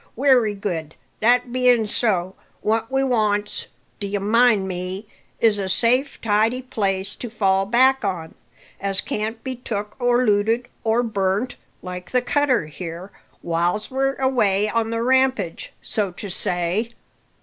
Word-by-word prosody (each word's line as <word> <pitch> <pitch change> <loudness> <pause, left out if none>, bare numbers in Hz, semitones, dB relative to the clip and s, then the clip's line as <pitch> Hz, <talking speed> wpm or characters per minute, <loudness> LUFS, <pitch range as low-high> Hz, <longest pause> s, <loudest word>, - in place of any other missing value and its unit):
Wery 245 -5 +3
good, 165 -6 -4 0.2
that 245 +2 +3
bein' 250 -3 +4
so, 190 -4 0 0.3
what 225 +1 0
we 270 0 +2
wants, 210 -5 0 0.3
d'ye 200 0 -2
mind 215 0 +3
me, 185 +3 -5 0.3
is 220 -3 +3
a 190 -1 -2
safe, 250 +8 +1
tidy 225 +4 +1
place 195 -5 -2
to 240 - -7
fall 195 -3 +1
back 260 +3 +4
on, 175 -5 -3 0.5
as 195 -1 0
can't 220 +3 -3
be 260 -1 -4
took, 210 -4 -5
or 245 +1 +3
looted, 225 +3 +2 0.2
or 225 +2 +2
burnt, 205 +2 -1 0.3
like 180 0 -7
the 250 - +2
cutter 265 - +2
here, 170 +4 -8 0.3
whiles 175 +6 -1
we're 270 +1 0
away 215 -7 +2
on 230 0 0
the 230 0 -1
rampage, 260 -8 +1
so 210 -3 -1
to 195 +1 -7
say." 180 +7 -1
215 Hz, 140 wpm, -22 LUFS, 195-245 Hz, 0.5 s, bein